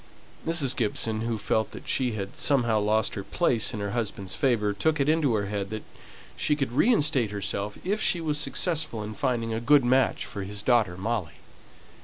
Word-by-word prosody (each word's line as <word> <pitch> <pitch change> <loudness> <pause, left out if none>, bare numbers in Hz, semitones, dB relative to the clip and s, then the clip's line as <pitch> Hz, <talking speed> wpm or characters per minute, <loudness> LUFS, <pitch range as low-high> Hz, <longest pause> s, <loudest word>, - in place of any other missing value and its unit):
Mrs. 155 -6 +3
Gibson, 110 -1 0
who 115 -1 -1
felt 110 +1 -1
that - - -10
she 125 -3 0
had 100 -2 -5
somehow 120 -6 +2
lost 105 +1 +1
her 100 - -4
place 120 - 0
in 105 - -5
her 100 -1 -3
husband's 100 -5 -3
favour, 110 -6 +1
took 155 +10 0
it 140 - +1
into 155 -6 +2
her 100 -1 0
head 100 -1 -3
that 110 0 -5 0.5
she 150 - +1
could 135 -5 -2
reinstate 145 - +3
herself 100 0 -3
if 205 +4 -1
she 175 - +2
was 150 -2 -1
successful 155 - -1
in 105 +1 -6
finding 120 -4 -1
a 110 - -1
good 135 +2 +5
match 130 0 +2
for 100 - -6
his 100 +2 -5
daughter 110 -8 +2
Molly. 100 -4 -3
115 Hz, 190 wpm, -27 LUFS, 105-140 Hz, 0.5 s, good